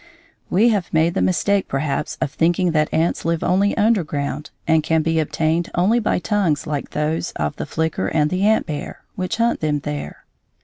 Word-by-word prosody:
We 215 +7 +4
have 205 -6 -1
made 160 +1 +2
the - - 0
mistake 195 +2 +1
perhaps 140 +1 -2
of 140 - -1
thinking 175 +3 +1
that 155 -1 +1
ants 165 +2 0
live 165 0 0
only 195 +3 +2
underground 155 - 0 0.2
and 160 -1 +4
can 160 0 +1
be 165 0 +1
obtained 160 +2 0
only 200 +7 +3
by 220 - 0
tongues 180 -7 0
like 145 -2 -3
those 155 +3 -2
of 75 -1 -2
the - - -4
flicker 160 0 -1
and 150 -1 +1
the 185 +1 -1
ant 215 +2 +3
bear, 150 -2 -6
which 185 +4 -3
hunt 235 +1 +1
them 150 -2 0
there. 145 0 -6
165 Hz, 185 wpm, -21 LUFS, 150-190 Hz, 0.2 s, We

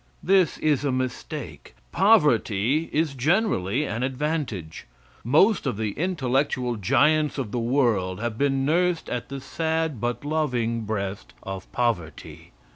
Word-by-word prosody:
This 190 -2 +3
is 150 -3 +1
a 140 - +1
mistake. 130 - -5 0.2
Poverty 130 +12 +3
is 155 -2 0
generally 145 - +1
an 115 -2 -3
advantage. 130 - -3 0.4
Most 155 - +3
of 125 - -2
the 110 -1 -1
intellectual 130 - -1
giants 145 +9 +2
of 125 -7 -3
the 120 - -1
world 115 -7 +1
have 115 0 -3
been 135 +1 +1
nursed 175 +2 +1
at 125 -1 -4
the 140 0 -5
sad 160 -2 -2
but 120 +3 -2
loving 125 -7 -1
breast 100 -1 -4
of 95 -1 -7
poverty. 115 -10 -3
130 Hz, 130 wpm, -25 LUFS, 115-155 Hz, 0.4 s, This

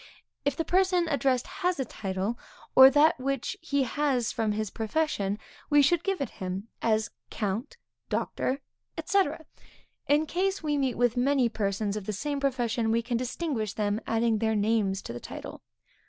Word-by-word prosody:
If 285 -1 +1
the 325 - -2
person 365 -2 +2
addressed 265 -4 +1
has 360 -4 -2
a 265 - 0
title, 195 0 -3 0.4
or 265 0 +11
that 295 +1 +4
which 275 +6 -2
he 280 -4 +1
has 260 -2 0
from 220 -2 0
his 215 -1 -2
profession, 220 -4 -1 0.3
we 290 -1 +6
should 340 +4 +3
give 390 -1 -1
it 270 - -2
him, 190 +4 -4
as 220 -1 +1 0.2
Count, 220 - -3 0.3
Doctor, 270 +2 -1 0.4
&c. 395 0 +4 0.8
In 295 +2 +3
case 380 +3 -1
we 300 -1 0
meet 265 -4 0
with 245 0 +2
many 260 -1 +3
persons 205 -1 -1
of 210 -3 -5
the 215 - -1
same 285 +7 -2
profession, 240 -4 0
we 230 +1 +2
can 240 0 -1
then 250 - -2
distinguish 245 - -2
them, 210 +1 -1
adding 225 -1 +2
their 220 0 +1
name 210 -1 +2
to 190 -11 -6
the 120 - -6
title. - - -8
245 Hz, 170 wpm, -28 LUFS, 215-290 Hz, 0.8 s, or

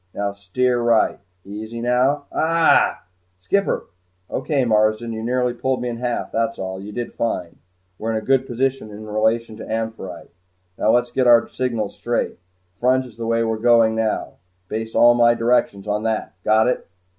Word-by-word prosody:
Now 100 0 -2
steer 120 +6 0
right 115 -2 +2 0.3
easy 110 +3 -7
now 125 +4 +1
aagh!" 165 0 +3 0.4
"Skipper!" 200 - 0 0.5
"Okay, 135 -1 0
Marsden. 110 +1 +1
You 110 - -5
nearly 125 +1 0
pulled 130 +1 -1
me 125 0 -3
in 115 - -4
half 120 0 -3
that's 115 0 -1
all. 95 0 -5
You 105 +2 -8
did 120 +2 -5
fine. 90 -7 -3 0.4
We're 110 0 -1
in 110 - -5
good 135 0 +2
position 130 -1 -1
in 105 +1 -9
relation 110 +1 0
to 110 - -8
'Amphitrite.' 110 -6 -5 0.5
Now - - +2
let's 120 +1 +3
get 130 -2 +1
our 120 -1 +6
signals 115 -5 -3
straight. 120 0 -2 0.3
Front 130 +6 +1
is 120 -4 -13
the 115 0 -5
way 115 0 +2
we're 110 -1 -1
going 115 -1 +4
now 110 -1 -2 0.3
base 110 +1 -4
all 120 0 +7
my 120 0 +4
directions 115 -4 +1
on 105 0 0
that 110 -1 -2
got 110 +1 +4
it?" 125 - -1
115 Hz, 170 wpm, -21 LUFS, 110-125 Hz, 0.5 s, all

